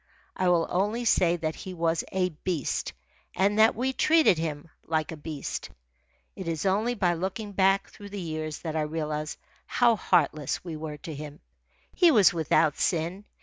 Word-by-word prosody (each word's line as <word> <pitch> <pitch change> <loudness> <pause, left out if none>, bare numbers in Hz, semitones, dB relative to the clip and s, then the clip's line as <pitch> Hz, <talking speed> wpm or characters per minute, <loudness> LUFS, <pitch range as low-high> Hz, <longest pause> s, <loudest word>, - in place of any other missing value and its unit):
I 185 -1 +1
will 170 -2 +3
only 210 +6 0
say 175 -5 +3
that 160 -2 -2
he 185 +2 -8
was 165 -1 0
a 185 -1 +1
beast, 160 -2 -3 0.4
and 205 +2 +2
that 220 +1 +6
we 260 +3 -1
treated 310 - +4
him 155 -2 -4 0.2
like 160 0 -1
a - - -5
beast. 150 -1 -5 0.7
It 190 - -7
is 165 +2 -2
only 215 +6 +1
by 180 -5 +2
looking 190 +5 -4
back 195 0 +2
through 205 -1 -11
the 200 0 -6
years 155 -3 -4
that 160 -2 -4
I 155 - +1
realise 150 0 -3 0.3
how 240 -2 +3
heartless 150 -8 +1
we 170 -3 -6
were 155 -1 -6
to 160 +2 -8
him. 150 +1 -8 0.5
He 350 - +5
was 210 - +6
without 160 -2 +2
sin. 175 +4 -1
170 Hz, 175 wpm, -27 LUFS, 155-200 Hz, 0.7 s, that